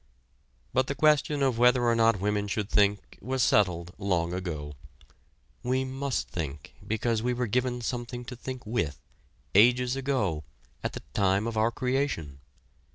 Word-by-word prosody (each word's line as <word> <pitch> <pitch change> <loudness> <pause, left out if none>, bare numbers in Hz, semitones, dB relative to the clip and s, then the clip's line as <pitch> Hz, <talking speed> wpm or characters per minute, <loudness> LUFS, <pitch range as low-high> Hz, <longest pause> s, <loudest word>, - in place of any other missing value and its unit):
But 130 0 +2
the 140 - -2
question 150 0 +3
of 130 -4 +1
whether 125 0 +5
or 120 -1 +3
not 115 -2 +3
women 105 +1 0
should 105 +1 -2
think 100 -1 +1
was 130 +1 0
settled 90 -4 +2
long 90 -3 0
ago. 80 -5 -4 0.9
We 130 +1 0
must 135 0 -2
think 75 -4 -6
because 110 +1 0
we 125 +2 0
were 125 0 0
given 125 +2 0
something 120 +1 -4
to 125 0 -7
think 130 0 -7
with, 105 - -2 0.5
ages 125 +4 +5
ago, 130 - -1 0.4
at - - -2
the - - -7
time 100 +1 +2
of 115 -1 -3
our 110 +1 +3
creation. 125 - -2
115 Hz, 155 wpm, -28 LUFS, 100-125 Hz, 0.9 s, whether